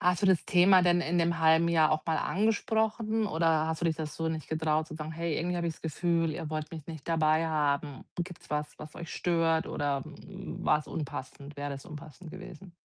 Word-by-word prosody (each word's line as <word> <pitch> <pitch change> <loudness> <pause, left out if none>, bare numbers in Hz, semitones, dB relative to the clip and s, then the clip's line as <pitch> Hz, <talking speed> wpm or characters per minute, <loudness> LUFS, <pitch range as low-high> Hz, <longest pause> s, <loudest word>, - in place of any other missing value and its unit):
Hast 180 +2 +2
du - - +4
das 190 -3 +4
Thema 185 +1 +6
denn 175 0 +4
in 170 +1 -1
dem 170 0 +1
1/2 160 +1 +5
Jahr 160 -2 +4
auch 155 0 0
mal 160 -1 0
angesprochen 220 +1 +1
oder 160 -3 +2
hast 160 0 -2
du 170 - +1
dich 160 -2 +1
da 160 - -3
so 160 +2 -3
nicht 160 -3 -4
getraut 155 -1 0
zu 160 - -9
sagen: 155 0 -5
„Hey, 165 -1 -2
irgendwie 175 +2 -1
habe 170 -1 -1
ich 165 - -1
das - - -20
Gefühl, 165 0 0
ihr 155 0 -5
wollt 155 -1 -3
mich 160 -3 -8
nicht 160 -3 -8
dabei 160 0 +3
haben. 145 -3 -1
Gibt's 175 0 -6
was, 150 0 -3
was 150 - -10
euch 170 - -8
stört?“ 165 -2 +1
oder, 140 -2 -1 0.2
hm, - - -8
war‘s 150 0 +2
unpassend 140 -1 -6
wäre 145 0 -4
das 135 -1 -7
unpassend 155 +2 -10
gewesen? 180 +3 -10
160 Hz, 220 wpm, -30 LUFS, 155-175 Hz, 0.2 s, Thema